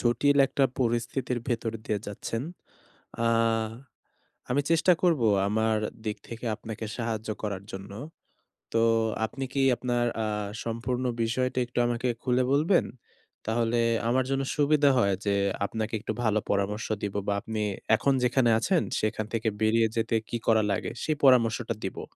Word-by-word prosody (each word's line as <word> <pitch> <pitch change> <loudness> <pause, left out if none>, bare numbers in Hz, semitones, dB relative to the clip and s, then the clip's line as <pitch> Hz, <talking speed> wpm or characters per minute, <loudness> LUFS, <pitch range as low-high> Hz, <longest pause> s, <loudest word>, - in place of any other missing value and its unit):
জটিল 125 +4 +2
একটা 135 0 +1 0.2
পরিস্থিতির 120 +1 -1
ভেতর 115 -2 -1
দিয়ে 105 - -1
যাচ্ছেন। 115 +3 -4 0.8
আ - - +4 1.2
আমি 135 +4 +2
চেষ্টা 170 +2 +5
করব 170 -7 +3 0.3
আমার 110 +1 +1 0.3
দিক 105 -1 -2
থেকে 115 +1 -7
আপনাকে 110 +1 -7
সাহায্য 110 -2 -3
করার 100 -2 -3
জন্য। 95 +1 -8 0.8
তো 115 - +3 0.5
আপনি 135 +4 -6
কি 140 - +1
আপনার 120 -1 0 0.2
আ - - -1 0.4
সম্পূর্ণ 120 +2 -2 0.2
বিষয়টা 125 +2 0
একটু 120 0 -3
আমাকে 120 +1 -1 0.2
খুলে 125 0 +2
বলবেন? 160 +6 +3 0.6
তাহলে 115 +1 +1 0.3
আমার 130 +1 +3
জন্য 135 0 0
সুবিধা 145 0 +4
হয় 100 -4 +3
যে 100 - +2 0.3
আপনাকে 110 +2 -4
একটু 105 - -4
ভালো 110 -1 +2
পরামর্শ 100 +2 0 0.2
দিব 100 -1 -3
বা 100 - +2
আপনি 110 0 -4 0.3
এখন 140 +5 +2
যেখানে 125 0 +3
আছেন 180 +4 +2 0.2
সেখান 110 0 -1
থেকে 115 -1 +1
বেরিয়ে 110 +1 +4
যেতে 115 0 +1
কি 120 - -1
করা 110 -1 +4
লাগে 100 - -2
সেই 155 -1 0
পরামর্শটা 120 -3 +4
দিবো। 95 - -4
115 Hz, 145 wpm, -27 LUFS, 110-130 Hz, 1.2 s, চেষ্টা